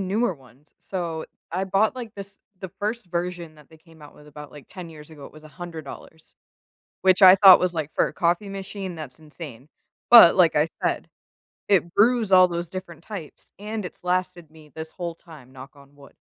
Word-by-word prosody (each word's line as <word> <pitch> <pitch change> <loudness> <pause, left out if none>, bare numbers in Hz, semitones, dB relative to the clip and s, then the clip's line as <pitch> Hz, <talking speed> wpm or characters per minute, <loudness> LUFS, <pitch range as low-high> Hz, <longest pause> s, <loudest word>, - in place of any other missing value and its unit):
newer 195 +1 -1
ones. 130 +1 -22
So, 170 -4 -5 0.3
I 185 +2 -1
bought, 200 +4 +1
like, 240 -4 -8
this 200 0 -10 0.2
the 190 -1 -8
1st 215 0 -3
version 175 -2 -5
that 150 -2 -19
they 160 - -18
came 160 0 -21
out 145 - -14
with 150 - -18
about, 150 0 -12
like, 145 -2 -14
10 180 -3 -10
years 150 0 -13
ago. 150 -3 -13
It - - -16
was 155 0 -16
$100, 160 -1 -11 0.7
which 185 0 +3
I 185 0 +9
thought 195 -1 +8
was 180 -1 0
like, 155 -2 -4
for - - +1
a - - -10
coffee 175 +4 -1
machine, 195 -1 -7
that's 150 -5 -9
insane. 150 -4 -12 0.4
But 235 -8 +9
like 175 -4 +4
I 150 +1 +3 0.2
said, - - -1 0.6
it 175 -4 +1
brews 225 -1 +2
all 185 -1 +7
those 170 -1 -4
different 185 -4 -9
types 190 -8 -10
and 210 0 -6
it's - - -10
lasted 180 -2 -2
me 155 -1 -18
this 160 0 -8
whole 170 -2 -6
time. 150 -7 -16
Knock 130 +1 -12
on 140 0 -19
wood. 140 -1 -18
170 Hz, 200 wpm, -23 LUFS, 155-190 Hz, 0.7 s, I